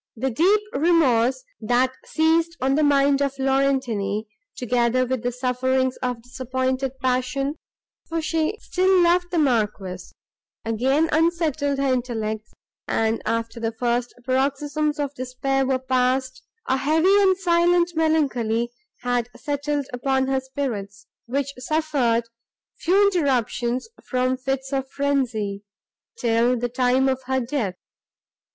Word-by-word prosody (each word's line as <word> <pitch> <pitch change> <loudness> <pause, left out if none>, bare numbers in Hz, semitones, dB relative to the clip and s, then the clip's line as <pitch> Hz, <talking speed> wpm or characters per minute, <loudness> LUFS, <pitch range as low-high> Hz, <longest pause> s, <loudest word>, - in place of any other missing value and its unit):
The 260 +3 -1
deep 375 - +3
remorse, 275 - +3 0.2
that 245 +3 +1
seized 330 +1 +1
on 265 +1 +1
the 300 - +2
mind 280 -1 +3
of 280 -1 -1
Laurentini, 265 -7 0 0.3
together 245 +1 +1
with 255 -1 -2
the 245 - -1
sufferings 255 +1 0
of 245 -2 -3
disappointed 260 +1 -2
passion, 260 +3 -1 0.5
for 330 0 -1
she 320 +4 -1
still 370 0 +2
loved 355 +1 +3
the 350 - -2
Marquis, 210 - 0 0.6
again 265 +8 +2
unsettled 315 -3 +1
her 275 -1 +1
intellects, 220 -4 -3 0.4
and, 225 0 0
after 230 0 -2
the 225 -1 -1
first 240 +1 -1
paroxysms 285 +3 0
of 285 -1 -2
despair 260 +1 -1
were 265 -1 +2
passed, 255 0 0 0.3
a 265 - +2
heavy 320 +8 +3
and 380 -2 +4
silent 345 -1 +3
melancholy 250 -8 +1 0.3
had 245 -1 -1
settled 290 0 -2
upon 265 +1 +1
her 265 0 +1
spirits, 230 -7 -5 0.2
which 280 +3 -2
suffered 265 -5 +1 0.5
few 380 +4 +3
interruptions 255 - 0 0.2
from 255 0 +1
fits 270 +1 -3
of 270 -1 -1
frenzy, 250 -9 -1 0.6
till 235 +1 +2
the 245 +1 -2
time 255 +2 +2
of 260 0 0
her 265 0 +1
death. 235 -7 -2
260 Hz, 125 wpm, -23 LUFS, 245-290 Hz, 0.6 s, and